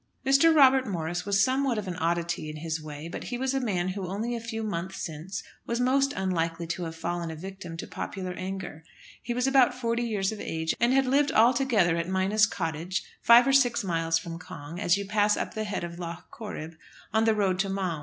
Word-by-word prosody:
Mr. 275 +5 +6
Robert 265 -3 +6
Morris 175 -1 -3
was 195 -1 +4
somewhat 260 -2 +1
of 205 -2 -3
an 180 - -3
oddity 170 -1 -1
in 155 - -6
his 160 0 -3
way; 150 0 -7
but - - -6
he 245 - -3
was 265 +1 -1
a 270 - +1
man 185 -8 -1
who 190 0 -4
only 220 +6 -2
a - - -3
few 225 -1 -5
months 190 -2 -4
since 165 +5 -5 0.2
was 235 +1 -1
most 270 +2 +3
unlikely 170 -4 -1
to 170 +2 -3
have 165 0 -6
fallen 170 0 -3
a 160 - -5
victim 185 0 -8
to - - -5
popular 185 -2 -5
anger. 185 -3 -6 0.4
He 240 - -3
was 250 +1 +1
about 270 -2 +4
forty 235 -1 -1
years 210 -5 0
of 215 - -6
age, 160 0 -2
and 235 +2 +3
had 270 0 +4
lived 275 +2 +2
altogether 230 -7 +3
at 170 +1 -2
Minas 195 +3 +3
Cottage, 170 -1 -3 0.2
five 235 +1 +7
or 270 - +2
six 245 -4 +4
miles 165 -3 +1
from 165 0 -6
Cong, 165 -1 -9
as 185 -2 +3
you 200 - -4
pass 210 +1 +2
up - - -3
the 215 0 -3
head 205 -3 -3
of 170 0 -6
Lough 170 0 -6
Corrib, 165 -7 -7 0.4
on 220 +1 +3
the 220 -1 +3
road 190 -3 +1
to 195 0 +1
Maum. 185 -5 -2
190 Hz, 225 wpm, -27 LUFS, 170-235 Hz, 0.4 s, five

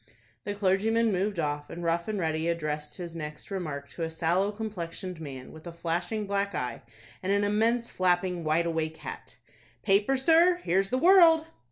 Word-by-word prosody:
The 205 - -3
clergyman 215 +3 +2
moved 195 +1 -1
off, 145 -1 -2
and 175 - -7
Rough 170 +2 0
and 215 -1 -2
Ready 160 -2 -1
addressed 150 -3 -3
his 170 -2 -7
next 150 +2 -7
remark 155 -7 -4
to - - -9
a 165 - -1
sallow 170 +5 +1
complexioned 185 -4 -6
man, 135 -4 -8
with 160 +2 -12
a - - -5
flashing 175 +6 -2
black 200 -1 -1
eye, 125 -2 -3 0.4
and 190 - -1
an 200 0 +2
immense 225 +3 +1
flapping 180 -1 +1
wide 160 +2 +2
awake 160 -1 -2
hat. - - -9 0.5
"Paper, 205 +7 +3
sir? 330 +6 +5
Here's 195 +2 +1
the 255 - 0
'World'!" 330 -1 +6
180 Hz, 175 wpm, -28 LUFS, 160-210 Hz, 0.5 s, World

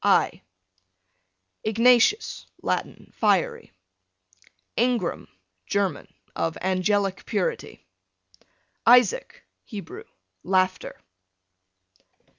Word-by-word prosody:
I - - +2 1.2
Ignatius, 240 - +3 0.2
Latin, - - -3
fiery. 205 -5 0 1.0
Ingram, 235 -6 0 0.4
German, 200 -6 -1 0.2
of 165 - -2
angelic 190 +1 0
purity. 480 -2 -3 1.0
Isaac, 250 - +4 0.2
Hebrew, 375 - -9 0.4
laughter. 185 0 0
210 Hz, 60 wpm, -25 LUFS, 185-250 Hz, 1.2 s, Isaac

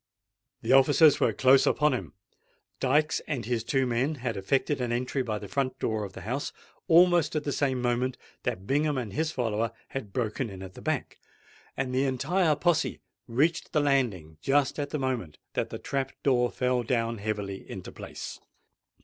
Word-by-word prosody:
The - - 0
officers 145 +3 +6
were - - +3
close 130 +1 +5
upon 150 -2 +3
him. 125 - -4 0.7
Dykes 150 +4 +2
and 135 -8 -2
his 120 -1 -1
two 135 +2 +1
men 125 +5 0
had 120 -4 -3
effected 135 +8 0
an 120 -1 -1
entry 125 +3 -1
by 110 -4 -2
the 105 - -7
front 135 +4 -1
door 110 -1 -1
of 100 -2 -7
the - - -9
house 125 +6 -3 0.4
almost 175 -1 +5
at 150 - 0
the 145 - -2
same 135 -2 0
moment 125 +1 0 0.2
that 95 - -3
Bingham 145 +3 +1
and 115 -6 -4
his 155 +1 0
follower 115 -4 -1 0.2
had 130 -7 -5
broken 115 +2 -2
in 95 -1 -8
at 95 -1 -9
the - - -11
back; - - -2 0.6
and 125 - -2
the 130 +2 +2
entire 155 +5 +2
posse 165 +2 +1 0.3
reached 155 +8 +1
the 150 - +4
landing 115 - 0
just 140 - +2
at 145 -1 -2
the 150 - -2
moment 125 - -2 0.2
that - - -1
the - - -5
trap 135 -1 -3
door 125 -3 +3
fell 125 0 0
down 115 -1 -1
heavily 100 -2 -4
into - - -7
its - - -24
place. - - -7
130 Hz, 185 wpm, -28 LUFS, 115-145 Hz, 0.7 s, officers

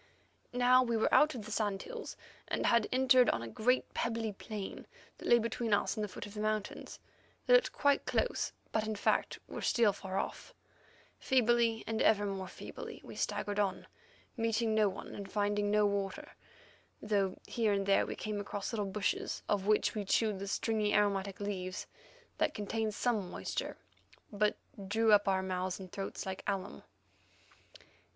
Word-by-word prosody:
Now 250 +1 +5
we 235 -2 +1
were 220 - +1
out 305 -2 +5
of 220 -4 -6
the 215 - -8
sand 205 -2 -1
hills, 485 0 -7 0.3
and - - -1
had 235 -2 +3
entered 255 -1 +5
on 115 - 0
a - - -5
great 245 - +1
pebbly 225 -2 -1
plain 200 0 -7 0.3
that - - -6
lay 240 - +7
between 230 -1 +1
us 205 - -1
and 215 - -2
the - - -1
foot 185 - -8
of 205 - -10
the 210 - -6
mountains. 215 -1 -3 0.5
These - - +4
looked - - +5
quite 285 -1 +2
close, - - 0 0.2
but 220 0 0
in 220 - -2
fact 200 - +1
were - - -6
still 225 -4 +3
far 190 0 -5
off. - - -4 0.6
Feebly 235 -3 +3
and 225 -1 -1
ever 205 -1 +4
more 195 -2 -3
feebly - - -8
we - - -10
staggered 205 0 -2
on, 195 -2 0 0.5
meeting 225 -1 +1
no 215 -2 +4
one 190 - -8
and 200 -1 -7
finding 205 0 +1
no 210 0 +4
water, 200 -1 -2 0.7
though 200 -3 0
here 225 -3 0
and 200 -1 +1
there 195 0 +3
we - - -4
came 215 -1 -3
across 205 +2 -4
little 210 -3 -1
bushes, 200 +1 -2
of 200 -1 0
which 215 0 +3
we 210 - -2
chewed 210 0 +1
the 200 - -5
stringy 210 0 0
and - - +6
aromatic 200 -1 0
leaves 185 -3 -4 0.5
that - - +1
contained 215 +1 -2
some 215 -7 0
moisture, - - -4 0.6
but 210 +1 +1 0.3
drew 220 +2 +3
up 205 -1 +6
our 190 -1 +2
mouths 185 0 -2
and 185 -2 -9
throats 195 -1 -5
like 190 0 -4
alum. 195 -1 -3
210 Hz, 175 wpm, -33 LUFS, 200-225 Hz, 0.7 s, lay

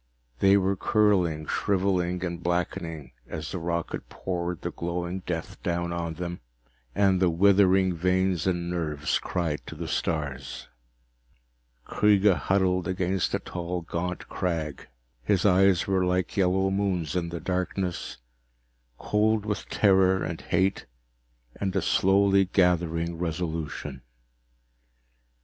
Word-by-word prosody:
They 100 +1 +5
were 95 0 +1
curling, 90 -7 +2
shriveling 90 -2 0
and 85 -1 -4
blackening 80 -5 -2 0.2
as 80 -1 -6
the 90 - -3
rocket 85 0 -3
poured 90 -2 -4
the - - -2
glowing 85 +2 -3
death 85 -2 -4
down 85 0 -1
on 85 -1 -3
them, 85 +1 -5 0.6
and 95 -2 +3
the 90 - +4
withering 95 +1 +4
veins 90 0 +1
and 85 -2 0
nerves 75 -4 -1
cried 85 -5 -2
to - - -7
the - - -5
stars. 70 -6 -3 1.2
Kreega 105 -2 +4
huddled 90 -1 +1
against 95 0 0
a - - -1
tall 90 0 -4
gaunt 85 +2 -4
crag. 80 -5 -3 0.3
His 95 +8 +1
eyes 95 -2 +4
were 95 -1 +1
like 90 0 0
yellow 95 0 +2
moons 95 -5 -1
in 85 -2 -1
the 85 0 -5
darkness, 90 -4 -3 0.8
cold 105 0 +1
with 105 -2 -3
terror 95 -2 +3
and 80 0 -4
hate 95 +3 0 0.7
and 95 -2 -2
a - - +2
slowly 100 0 +4
gathering 85 -2 +1
resolution. 80 -5 -4
90 Hz, 125 wpm, -27 LUFS, 85-95 Hz, 1.2 s, They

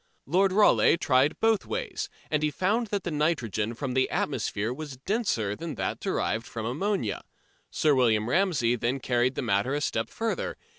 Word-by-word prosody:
Lord 190 +6 +3
Rayleigh 205 -4 +5
tried 145 -3 +2
both 225 -2 +2
ways, - - -3 0.2
and 150 -1 +1
he 155 - +2
found 205 +9 0
that 205 -1 -2
the 175 - -3
nitrogen 120 - -1
from 130 +1 -3
the 130 0 +2
atmosphere 110 +4 -1
was 140 -1 -7
denser 135 - -1
than 165 +2 -6
that - - -3
derived 110 +2 -1
from 115 -2 -5
ammonia. 145 - -1 0.5
Sir 150 - +2
William 115 -5 +3
Ramsey 150 -7 +2
then 120 +3 -1
carried 125 0 +1
the - - -2
matter 110 +4 +1
a - - 0
step 115 -5 -1
further. 225 0 -3
140 Hz, 170 wpm, -27 LUFS, 115-185 Hz, 0.5 s, Rayleigh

